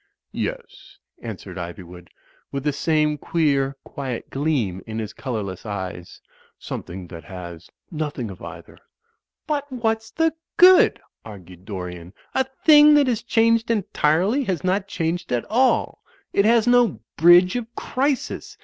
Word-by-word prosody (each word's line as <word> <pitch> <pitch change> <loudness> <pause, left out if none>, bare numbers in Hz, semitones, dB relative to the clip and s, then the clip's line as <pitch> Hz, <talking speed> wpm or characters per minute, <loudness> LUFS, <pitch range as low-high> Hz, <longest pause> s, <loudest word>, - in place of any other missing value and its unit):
"Yes," - - -6 0.2
answered 100 -4 -8
Ivywood, 85 0 -9 0.4
with 140 -1 -4
the 150 -1 0
same 150 0 +1
queer, 140 -5 0
quiet 130 -4 -6
gleam 135 - -1
in 110 0 -5
his 110 -1 -4
colourless 105 -8 -5
eyes, 95 -4 -6 0.4
"something 90 +1 -7
that 85 -4 -10
has 85 -2 -9 0.2
nothing 150 - -4
of 95 - -12
either." 85 0 -11 0.7
"But 290 -2 -3
what's 225 -3 -1
the 325 0 +1 0.2
good?" 365 +1 +7 0.2
argued 95 -4 -12
Dorian. 90 -3 -7 0.2
"A 265 - +1 0.2
thing 300 -1 +8
that 290 -1 +5
has 240 -4 0
changed 230 0 +2
entirely 200 - +1
has 185 -6 -2
not 190 +2 0
changed 170 -2 -3
at 120 -1 0
all. 255 +3 +2 0.3
It 200 - +3
has 230 0 +4
no 245 - +3
bridge 175 +4 +6
of 240 -2 -3
crisis. 275 +1 -2
150 Hz, 135 wpm, -22 LUFS, -, 0.7 s, thing